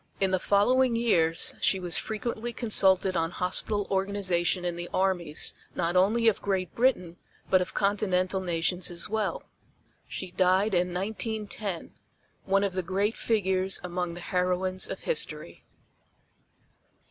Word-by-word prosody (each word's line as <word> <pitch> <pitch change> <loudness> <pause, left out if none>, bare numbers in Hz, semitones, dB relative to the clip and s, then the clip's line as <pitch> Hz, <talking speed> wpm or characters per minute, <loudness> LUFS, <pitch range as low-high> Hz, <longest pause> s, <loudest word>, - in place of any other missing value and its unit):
In 195 -1 +1
the 185 - +2
following 245 +6 +3
years 170 -9 +2
she 190 - +3
was 175 -2 +1
frequently 230 +2 -4
consulted 190 -5 +3
on 165 -1 0
hospital 195 +3 -2
organization 190 -2 0
in 175 -1 -2
the 175 0 -6
armies 180 -5 0 0.2
not 170 0 -1
only 215 +6 +3
of 220 - +3
Great 190 -4 -2
Britain 200 -9 +1 0.3
but 185 - +5
of 180 - -4
Continental 195 -2 +1
nations 175 0 0
as 170 -1 -2
well. 215 0 -2 0.6
She 185 -2 -6
died 190 +3 +2
in 180 0 +1
1910, 205 -1 -4 0.5
one 195 +1 +2
of 200 -2 -1
the 185 - -1
great 195 +5 -1
figures 190 -3 +1
among 180 -1 -3
the 175 - -8
heroines 185 +1 -1
of - - -6
history. - - -2
190 Hz, 135 wpm, -27 LUFS, 180-205 Hz, 0.6 s, but